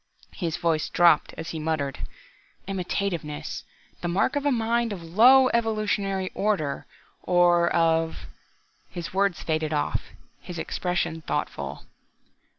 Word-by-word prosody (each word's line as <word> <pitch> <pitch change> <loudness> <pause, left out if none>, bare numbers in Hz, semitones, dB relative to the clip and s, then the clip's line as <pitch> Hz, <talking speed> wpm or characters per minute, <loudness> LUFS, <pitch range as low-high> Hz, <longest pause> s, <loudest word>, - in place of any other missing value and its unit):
His 170 -5 -3
voice 165 -2 0
dropped, 175 -1 +4
as 160 - -5
he 160 - -5
muttered, 150 -3 -2 0.7
"Imitativeness 180 -5 -3 0.4
the - - -2
mark 190 +10 +1
of 285 0 0
a - - +3
mind 235 -1 +1
of 185 -4 -6
low 250 +10 +6
evolutionary 210 -4 0
order, 190 -9 -1 0.3
or 175 -1 +4
of 165 -1 +1 0.3
..." - - -39
his 175 -1 -6
words 195 -1 +1
faded 155 -1 -1
off, 150 - 0 0.4
his 175 -1 -8
expression 175 -1 -2
thoughtful. - - -4
175 Hz, 125 wpm, -26 LUFS, 160-205 Hz, 0.7 s, low